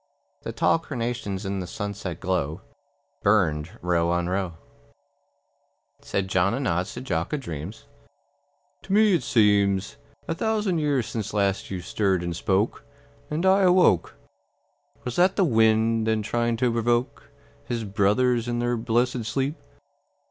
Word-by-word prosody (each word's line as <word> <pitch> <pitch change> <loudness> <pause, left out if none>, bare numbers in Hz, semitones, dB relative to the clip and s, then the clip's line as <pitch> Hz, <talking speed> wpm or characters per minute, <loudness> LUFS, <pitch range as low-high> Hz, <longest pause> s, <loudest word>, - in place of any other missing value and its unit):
The - - -5
tall - - +2
carnations 115 -9 -4
in 95 0 -2
the 90 - -5
sunset 100 -3 -5
glow 90 -5 -2 0.6
Burned 85 -7 +1
row 85 -1 +1
on 85 0 0
row. 95 -1 -2 1.5
Said 100 -1 -2
John 95 +4 +2
a - - -3
nods 90 -8 -1
to 120 - -6
Jock 90 - -2
a - - +1
dreams, 85 - -7 1.0
"To 195 - -5
me 215 -1 +5
it 170 - +2
seems 100 -4 +2 0.3
A - - 0
thousand 210 -2 0
years 145 -6 +1
since 110 -1 -5
last 100 -1 0
you 95 -2 -4
stirred 95 0 0
and 85 -1 -3
spoke, 95 +5 0 0.5
And 155 +4 -1
I 190 +1 +5
awoke. 180 - +4 0.9
Was 125 -1 -5
that 180 +2 +4
the 195 - +3
wind 110 -3 +3
then 110 -1 +1
trying 120 +1 0
to 125 0 +1
provoke 120 +1 -1 0.4
His 115 -2 -3
brothers 115 +4 +1
in 120 0 -1
their 120 0 0
blessed 120 +1 0
sleep?" 135 +7 -2
110 Hz, 145 wpm, -25 LUFS, 95-125 Hz, 1.5 s, me